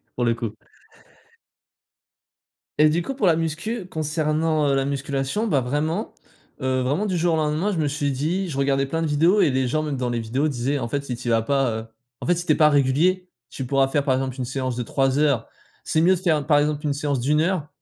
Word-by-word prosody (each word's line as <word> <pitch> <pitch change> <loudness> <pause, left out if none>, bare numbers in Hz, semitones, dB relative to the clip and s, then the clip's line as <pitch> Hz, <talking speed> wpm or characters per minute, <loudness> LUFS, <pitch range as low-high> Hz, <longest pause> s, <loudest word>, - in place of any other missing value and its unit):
pour 125 - -1
le 115 - +3
coup. 115 -2 -5 2.2
Et 155 0 +6
du 165 +3 +1
coup, 270 - -4
pour 260 - 0
la 165 -2 +4
muscu 170 +7 -3
concernant, 155 -1 0
heu, 140 - +2
la 135 - +1
musculation, 140 - -2
bah, 145 -10 +2
vraiment, 155 - -2 0.5
heu, 130 0 0
vraiment 145 +11 0
du 190 -3 -1
jour 170 -1 +2
au - - 0
lendemain, 155 +6 0
je 180 - -2
me 155 - +1
suis 145 0 -1
dit 170 +8 -1
je 135 - -5
regardais 140 0 +1
plein 165 +4 -2
de 165 - 0
vidéos 165 +7 +3
et 155 - +4
les 130 0 0
gens 155 +5 0
même 150 -2 -3
dans 125 -1 -2
les 120 -1 -1
vidéos 130 +7 -1
disaient: 135 +2 -1
«En 115 -2 -4
fait, 140 +3 -1
si 125 - -3
tu 120 +1 -8
y - - +2
vas 115 0 +3
pas, 135 +1 +1
heu, 110 0 -4 0.3
en - - -6
fait, 175 - +3
si 175 - -4
tu - - +2
es - - +4
pas 150 -1 +5
régulier, 155 +7 +2 0.2
tu 135 - -6
pourras 135 +1 +2
faire, 140 +1 0
par 135 -2 +2
exemple, 130 -1 -2
1 130 - -2
séance 130 -1 -3
de 125 - -2
3 135 +3 0
heures 140 -7 +2 0.4
c'est 155 - +2
mieux 185 +3 +5
de - - -5
faire, 160 -6 +1
par 150 -2 +5
exemple, 150 0 0
1 145 -2 0
séance 140 -1 -1
d'1 150 +5 +2
heure 170 -3 0
145 Hz, 245 wpm, -23 LUFS, 130-160 Hz, 2.2 s, Et